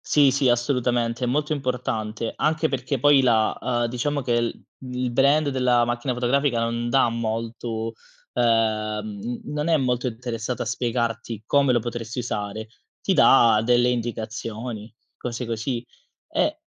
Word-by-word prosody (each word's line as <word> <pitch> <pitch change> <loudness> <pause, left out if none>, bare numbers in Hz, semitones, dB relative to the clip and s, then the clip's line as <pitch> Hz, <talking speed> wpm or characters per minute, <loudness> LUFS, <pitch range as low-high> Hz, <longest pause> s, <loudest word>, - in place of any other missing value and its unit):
Sì, 145 -3 +5
sì, 135 -1 +2
assolutamente, 120 -1 +1
è - - -2
molto 150 +4 0
importante. 120 -5 -3
Anche 155 0 +1
perché 135 0 -2
poi 145 +1 +6
la 115 -4 +3
ehm, 120 -1 0
diciamo 135 +5 -1
che 120 -1 +1
l 120 - -3 0.2
il 125 -1 -3
brand 140 +4 +3
della 125 -3 +2
macchina 120 +2 -2
fotografica 125 +1 +1
non 115 +1 -1
dà 135 0 +4
molto 115 0 -3 0.4
ehm, 125 - +1 0.6
n 110 +3 -5
non 150 +1 -3
è 165 -1 +4
molto 125 -2 0
interessato 115 0 -4
a - - -9
spiegarti 115 -2 -2
come 140 +1 +3
lo 120 - +3
potresti 120 0 -5
usare, 110 -2 -3 0.3
ti 195 - 0
dà 115 -7 +6
delle 120 +1 +3
indicazioni, 115 -1 -4 0.3
cose 120 +1 -4
così. 115 +2 -3 0.5
E - - 0
120 Hz, 145 wpm, -24 LUFS, 115-130 Hz, 0.6 s, poi